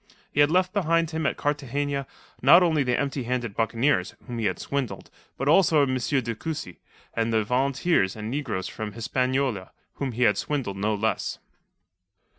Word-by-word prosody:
He - - -2
had 145 0 +6
left 180 +2 +2
behind 165 -4 +1
him 160 -1 -1
at - - -1
Cartagena 145 -1 -2 0.3
not 170 +8 +7
only 160 -4 +2
the 125 -2 +1
empty 140 -1 -1
handed 120 -4 -2
buccaneers, 115 -2 +1
whom 120 -2 -5
he 110 - -1
had - - 0
swindled, 130 -9 -4 0.3
but 135 - -2
also 160 -2 +5
M. 130 -2 0
de 125 -1 0
Cussy 150 - -6 0.3
and 115 0 0
the 110 -1 +2
volunteers 130 - +1
and 110 +1 -5
negroes 125 -10 -2
from 105 -1 -6
Hispaniola, 125 -3 -1 0.3
whom 135 -3 -2
he 125 +2 0
had 105 -3 +3
swindled 130 -10 -2
no 105 +2 0
less. 110 +2 -1
130 Hz, 170 wpm, -26 LUFS, 115-145 Hz, 0.3 s, not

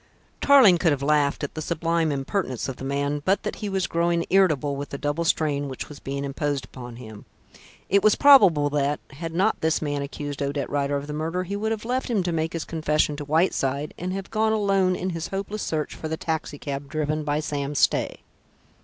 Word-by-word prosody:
Tarling 250 -11 +7
could 165 -2 +3
have 140 -1 -1
laughed 145 -1 +2
at 145 - -3
the 155 - -5
sublime 165 0 0
impertinence 135 - -2
of 135 - -5
the - - -8
man, 140 +2 -1
but 190 +3 +1
that - - -4
he 210 - -4
was 190 -2 0
growing 170 0 0
irritable 155 -7 +3
with 140 0 -5
the 140 - -5
double 145 +4 -1
strain 145 -3 0
which 130 - -6
was 150 - -10
being 140 +1 -4
imposed 140 0 -2
upon 120 -2 -10
him. 110 -4 -11 0.6
It 200 +1 +3
was 215 -1 +5
probable 200 - +6
that, 145 0 0
had 165 +4 -6
not 195 +5 +1
this 160 0 +2
man 145 -2 -2
accused 145 0 -5
Odette 140 -1 -2
Rider 145 0 0
of 140 - -5
the 150 - -6
murder, 165 +4 -2
he 195 +2 -4
would 220 +2 -1
have 220 0 -3
left 255 +2 -1
him 215 -6 +1
to 175 - -1
make 160 0 -1
his 165 -2 -3
confession 155 -2 0
to 145 - -5
Whiteside, 150 -3 0
and 180 +1 -4
have 195 0 -5
gone 220 0 +2
alone 195 -3 +2
in 185 +1 -3
his 165 -1 -4
hopeless 200 +2 -4
search 155 -2 -2
for 160 - -6
the 160 0 -3
taxicab 145 -4 -4
driven 155 0 -1
by 150 0 0
Sam 145 -1 -3
Stay. - - +1
155 Hz, 215 wpm, -25 LUFS, 145-185 Hz, 0.6 s, Tarling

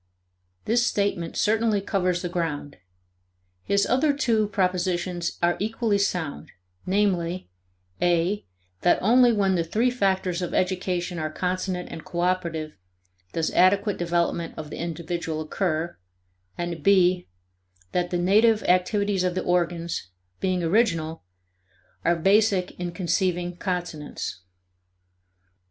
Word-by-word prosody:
This 235 +2 +3
statement 200 -5 -1
certainly 220 -1 +2
covers 185 -3 0
the - - -1
ground. 165 -5 -3 0.9
His 200 0 +2
other 285 +3 +2
two 230 -7 +1
propositions 180 -2 -1
are 175 0 +3
equally 215 0 0
sound; 165 -6 -2 0.4
namely, 185 - 0 0.5
(a) 175 +4 +2 0.4
that 175 - +4
only 240 +4 +5
when 200 -3 +2
the 170 -2 +1
three 225 +9 +1
factors 190 -6 0
of 175 - -3
education 180 -1 -1
are 155 0 -2
consonant 180 +2 -2
and 160 - -7
cooperative 170 - -2 0.5
does 165 -1 0
adequate 195 +3 +3
development 170 -1 -1
of 155 -1 -7
the - - -6
individual 170 -1 -3
occur, 160 +1 -2 0.6
and 175 -2 -4
(b) 185 -1 +4 0.6
that 175 -1 0
the 175 - -1
native 210 +5 +4
activities 190 +2 +2
of 180 -1 0
the - - -1
organs, 170 - -1 0.3
being 185 -2 0
original, 165 - +1 0.8
are 170 - +3
basic 195 +1 +3
in 175 -1 -3
conceiving 175 0 -1
consonance. 175 - -4
180 Hz, 115 wpm, -25 LUFS, 170-200 Hz, 0.9 s, only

